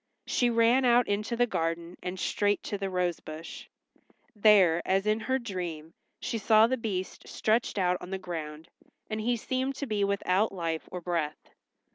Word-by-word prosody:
She 245 - +2
ran 235 +3 +4
out 245 -1 +4
into 210 +3 -1
the 245 +1 +3
garden, 165 -4 -2
and 180 +1 -5
straight 205 +2 0
to 205 - -3
the 195 -1 -2
rose 180 -2 -1
bush. 155 +2 -9 0.7
There, 200 -6 +5
as 195 +1 +1
in 215 +1 +2
her 260 +4 0
dream, 175 -9 -5 0.3
she 230 - -3
saw 215 +1 +6
the 255 +3 +1
Beast 200 -6 -4
stretched 220 0 0
out 180 -2 +2
on 180 - -8
the 190 - -2
ground, 160 -4 -6 0.4
and 215 0 -2
he 240 +2 +1
seemed 260 +4 -2
to 280 - -4
be 210 -5 0
without 200 +1 +1
life 165 -4 -3
or 180 - -5
breath. 165 -4 -3
200 Hz, 175 wpm, -29 LUFS, 175-230 Hz, 0.7 s, saw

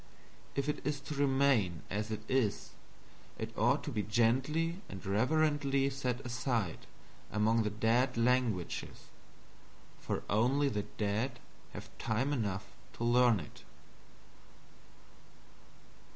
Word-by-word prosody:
If 140 +1 -1
it 150 - -1
is 145 -1 -1
to 150 - -6
remain 135 - +2
as 105 +2 -2
it 110 -1 -3
is, 125 -6 0 0.7
it - - -5
ought - - +2
to - - -4
be 105 - -1
gently 130 - +1
and 95 -2 -8
reverently 140 +5 +2
set 130 -1 -2
aside 120 - -2 0.4
among 110 +2 +3
the 105 - 0
dead 115 +5 +1
languages, 115 -6 0 0.9
for - - -3
only 130 +7 +2
the 105 -5 -3
dead 110 +5 -1 0.4
have - - -9
time 120 +5 0
to 100 +3 -6
learn 120 -2 +5
it. 75 - -11
120 Hz, 110 wpm, -33 LUFS, 105-135 Hz, 0.9 s, learn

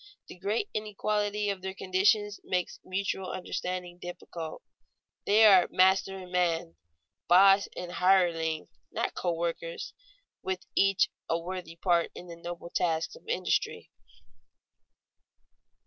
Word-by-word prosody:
The - - -11
great 210 - -1
inequality 210 -1 -1
of 195 -2 -6
their 190 0 -5
condition 195 +3 +2 0.2
makes 180 -1 -2
mutual 190 0 -2
understanding 180 -1 -4
difficult. 175 -2 -7 0.6
They 215 +2 +6
are 190 -4 +7
master 190 +1 +3
and 185 -1 -10
man, 170 - 0 0.5
"boss" 195 +2 +6
and 180 -1 -5
hireling, 170 -3 +2 0.2
not - - -2
co 175 - -1
workers, 165 0 -4 0.8
each 195 0 +3
with - - -59
a 165 - +2
worthy 175 -1 -6
part 170 0 +2
in - - -9
the 170 -1 -9
noble 170 0 -8
tasks 165 - 0
of 485 - -17
industry. 475 +1 -1
185 Hz, 120 wpm, -29 LUFS, 170-195 Hz, 0.8 s, are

